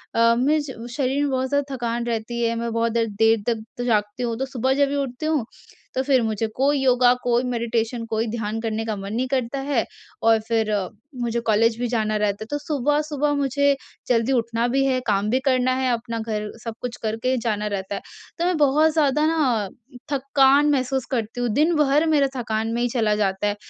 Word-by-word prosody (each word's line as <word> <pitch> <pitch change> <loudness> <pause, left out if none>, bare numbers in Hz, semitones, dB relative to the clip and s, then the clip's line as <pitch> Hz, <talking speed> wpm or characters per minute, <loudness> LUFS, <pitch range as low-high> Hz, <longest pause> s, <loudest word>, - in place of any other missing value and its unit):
अ, 230 0 +5
में 290 +5 +3
ज 260 -5 -8
शरीर 270 +2 0
में 290 - 0
बहुत 260 0 -1
ज़्यादा 285 -1 -1
थकान 235 -1 -2
रहती 235 0 -3
है। 230 0 +1
मैं 230 0 -3
बहुत 230 0 +1
देर, 230 0 +1
देर 225 +1 +2
तक 230 -2 0
तो 245 - -3
जागती 210 +1 0
हूँ, 230 -2 -2
तो 265 - -1
सुबह 260 0 0
जब 280 +1 +3
भी 285 - -2
उठती 275 0 -3
हूँ, 310 -6 +1 0.5
तो 260 - +2
फिर 265 -2 +3
मुझे 220 0 -1
कोई 280 +2 +2
योगा, 250 -1 +5
कोई 245 0 +2
मेडिटेशन, 235 -1 -1
कोई 225 0 -1
ध्यान 220 -1 -3
करने 225 0 -2
का 220 -1 -2
मन 200 +1 -6
नहीं 250 +3 0
करता 260 0 -1
है। 270 -4 0 0.4
और 225 0 +5
फिर 225 -2 +1 0.5
मुझे 235 0 -1
कॉलेज 225 +1 +3
भी 245 - 0
जाना 220 -2 0
रहता 210 0 -1
है, - - -11
तो 290 - 0
सुबह-सुबह 295 +1 0
मुझे 280 0 +2 0.3
जल्दी 235 +1 +2
उठना 235 -1 +1
भी 270 +3 +1
है, 260 -1 +2
काम 205 0 +1
भी 255 +4 +2
करना 255 -1 +3
है 260 -1 +1
अपना, 230 0 -3
घर 215 -2 -3
सब 230 - -4
कुछ 245 -1 -4
करके 225 +4 0
जाना 210 -2 0
रहता 200 -1 -3
है। - - -5 0.4
तो 340 - +1
मैं 360 -2 +1
बहुत 300 +2 +4
ज़्यादा 300 -1 +2
ना 255 -11 +1 0.4
थकान 275 +1 +4
महसूस 265 -2 0
करती 235 -1 -2
हूँ, 245 - 0
दिन 305 +9 +2
भर 300 +1 +3
मेरा 290 -3 +4
थकान 225 -1 -2
में 235 - -1
ही 245 - +2
चला 225 -3 +1
जाता 200 -1 0
है 205 - 0
240 Hz, 215 wpm, -23 LUFS, 225-270 Hz, 0.5 s, अ